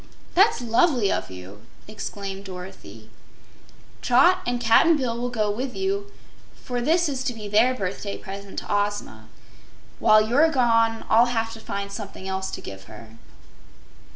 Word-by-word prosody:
"That's 390 - +4
lovely 240 - +2
of - - -2
you!" 95 +2 -11 0.2
declared 200 -2 -6
Dorothy. 180 - -10 0.9
"Trot 310 +10 +4
and 245 0 0
Cap'n 240 +8 +5
Bill 250 -5 -2
will 245 +1 -3
go 215 -4 0
with 250 +4 -4
you, 395 +1 -2 0.4
for 245 -1 -4
this 330 +6 +2
is 265 -3 -3
to 245 - -2
be 215 -2 -7
their 225 +5 +3
birthday 200 -1 -4
present 195 0 -9
to - - -4
Ozma. 205 - -2 0.7
While 215 0 +5
you're 285 +8 +4
gone 230 -5 +2
I'll 230 +2 +5
have 225 -2 -2
to 225 - -9
find 200 -2 -5
something 200 -2 -7
else 190 0 -3
to - - -7
give 95 0 -9
her." 110 +1 -12
225 Hz, 155 wpm, -24 LUFS, 195-250 Hz, 0.9 s, Cap'n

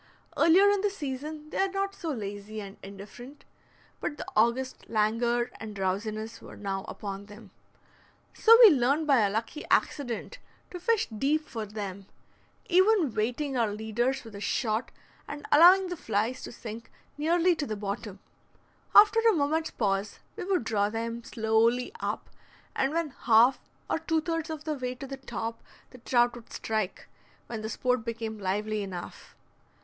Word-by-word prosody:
Earlier 350 +5 +6
in 405 -1 +1
the 415 - +2
season 300 -2 -6
they - - -3
are 390 - +3
not 395 0 -1
so 335 - -5
lazy 210 -4 -5
and 200 -1 -8
indifferent, 205 +8 -11 0.5
but 295 - -4
the - - -6
August 235 +4 +1
languor 235 +3 +1
and 215 -2 -7
drowsiness 215 +4 -3
were - - -11
now 195 -1 -3
upon 200 -1 -6
them. 205 -1 -13 0.8
So 460 0 +7
we 435 - +11
learned 280 +3 +2
by 275 -4 +4
a 205 -2 +3
lucky 225 +8 -3
accident 280 - 0 0.3
to 360 - -6
fish 445 +4 +1
deep 300 +7 0
for 220 -3 -5
them, 200 -2 -6 0.6
even 375 - +4
weighting 245 +6 -1
our 230 -4 +1
leaders 220 +5 -1
with 225 -2 -12
a 200 - -7
shot, 220 +1 -1 0.4
and 290 0 -7
allowing 360 +5 +7
the 355 - -3
flies 225 -2 -1
to - - -8
sink 230 0 -8 0.3
nearly 340 +4 +2
to 295 - -3
the 215 - -3
bottom. 200 0 -5 0.8
After 425 +2 +8
a - - +4
moment's 315 0 0
pause 200 -1 -1 0.2
we - - -5
would 370 -7 +1
draw 205 -2 +1
them 230 +1 -4
slowly 230 +5 +1
up, - - -3 0.5
and 270 +1 +1
when 330 -2 -1
half 240 +1 +4 0.3
or - - 0
two 320 0 0
thirds 330 -1 -3
of 315 -1 -5
the 310 - -2
way 255 -3 -4
to 265 - -8
the 270 0 -7
top 230 -3 -5 0.3
the 255 - -13
trout 240 0 +2
would 235 -1 -13
strike, 215 -4 -3 0.4
when 225 -2 -6
the 220 - -4
sport 250 +1 0
became 225 -1 -5
lively 210 +2 -1
enough. 185 -3 -8
240 Hz, 165 wpm, -28 LUFS, 215-305 Hz, 0.8 s, we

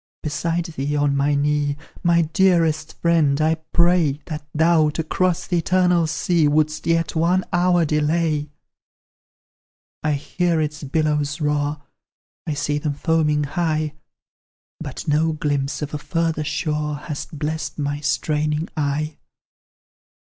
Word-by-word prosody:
Beside 165 +3 -1
thee, 150 -3 -3
on 145 -1 +2
my 140 +1 +2
knee, 145 0 +1 0.2
My 170 -1 +3
dearest 165 -2 +1
friend, 160 -4 +3
I 155 +1 +3 0.2
pray 170 -4 +3
That 155 -2 -5
thou, 160 0 +3
to 160 +2 -2
cross 180 +2 0
the 175 - 0
eternal 180 -1 +2
sea, 155 +1 +1
Wouldst 155 +2 +1
yet 165 -1 +1
one 175 +3 +2
hour 175 -1 +3
delay: 150 0 0 1.5
I 150 - +1
hear 165 +4 0
its 150 0 -2
billows 150 +1 0
roar 150 -1 -1 0.6
I 155 - -1
see 145 0 -1
them 145 -1 -2
foaming 150 -1 +1
high; 155 -1 -1 0.9
But - - -7
no 155 +2 +2
glimpse 145 -1 -1
of 150 - -5
a 150 - -2
further 160 0 -1
shore 150 -1 -2
Has 145 0 -6
blest 155 0 -4
my 145 -1 -2
straining 150 +2 -1
eye. 150 +1 -1
155 Hz, 130 wpm, -22 LUFS, 150-165 Hz, 1.5 s, My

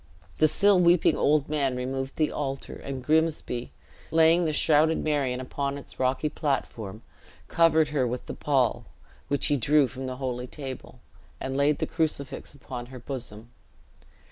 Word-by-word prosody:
The 155 - +6
still 195 +5 +4
weeping 175 -1 +4
old 145 -1 +2
man 140 -4 0
removed 135 +1 -3
the 155 -1 +1
altar; 135 -2 -4
and 135 -2 -6
Grimsby, 155 -5 0 0.4
laying 165 +2 +4
the 155 - +1
shrouded 155 +1 +3
Marion 140 -5 0
upon 140 +2 -3
its 140 - -12
rocky 130 +4 +1
platform, 115 -8 -3 0.4
covered 160 -2 +3
her 140 -4 +1
with 125 +1 -4
the - - -6
pall, 135 -5 +1 0.4
which 145 - 0
he 145 -1 +2
drew 140 +3 +4
from 130 +1 -7
the 130 - -4
holy 125 -1 -4
table, 135 -2 -8 0.4
and 135 0 -4
laid 140 +1 +3
the - - -1
crucifix 150 -4 -3
upon 125 -3 -7
her 130 0 -10
bosom. 120 -3 -7
140 Hz, 155 wpm, -27 LUFS, 130-155 Hz, 0.4 s, The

